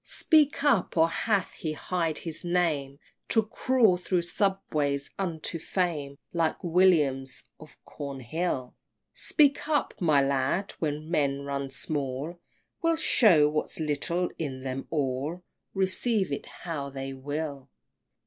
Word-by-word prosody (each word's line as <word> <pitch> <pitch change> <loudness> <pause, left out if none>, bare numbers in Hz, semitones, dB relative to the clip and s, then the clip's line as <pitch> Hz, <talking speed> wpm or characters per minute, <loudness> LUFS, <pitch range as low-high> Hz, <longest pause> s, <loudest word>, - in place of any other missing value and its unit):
XVII. - - -16
Speak 300 -3 +3
up! 250 -12 +2
or 165 +1 +5
hath 200 +2 0
he 155 -2 -4
hid 165 -1 -1
his 165 0 -5
name 160 -6 0 0.3
To 225 - +3
crawl 225 -2 +3
thro' 180 0 0
"subways" 155 -7 -1
unto 165 -3 -2
fame, 155 -6 -2 0.2
Like 165 -2 0
Williams 160 -7 +2 0.2
of 155 -1 -14
Cornhill? 140 0 -4 0.4
Speak 285 -1 +2
up, 305 -2 +1
my 155 -5 +4
lad! 140 +8 0
when 155 0 -3
men 140 -4 +1
run 140 -1 -3
small 145 +4 -3 0.4
We'll 330 -1 +3
show 210 - +5
what's 150 +2 -1
little 170 +4 0
in 135 -5 -4
them 130 0 -4
all, 145 +4 -2 0.3
Receive 190 0 +1
it 140 - -4
how 150 -5 -5
they 135 0 -5
will! 140 0 -5
160 Hz, 130 wpm, -28 LUFS, 140-185 Hz, 0.4 s, or